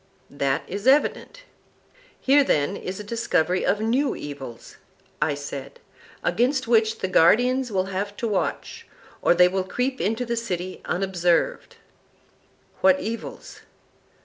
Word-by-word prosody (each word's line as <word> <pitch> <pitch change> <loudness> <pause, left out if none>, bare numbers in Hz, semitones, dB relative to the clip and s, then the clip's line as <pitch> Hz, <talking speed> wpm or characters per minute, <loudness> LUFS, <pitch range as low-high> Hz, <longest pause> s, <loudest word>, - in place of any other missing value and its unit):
That 140 -1 -1
is 200 +5 -5
evident. 300 - +2 0.8
Here, 280 +2 +4
then, 150 - +1
is 185 0 -6
a - - -6
discovery 200 -5 0
of 210 - +1
new 255 +6 +1
evils, 135 -5 -9 0.4
I 145 - +1
said, 140 -1 -7 0.4
against 245 +8 +1
which 225 -1 +2
the 190 - 0
guardians 245 +8 +3
will 190 -2 0
have 200 +2 -3
to 235 - -2
watch, 205 -3 -3 0.3
or - - +4
they 180 +1 +6
will 190 +1 -1
creep 250 +7 -2
into 225 +4 -1
the 235 0 -2
city 185 -6 -4
unobserved. 185 - 0 1.0
What 280 0 +4
evils? 230 -4 -7
205 Hz, 130 wpm, -24 LUFS, 180-245 Hz, 1.0 s, they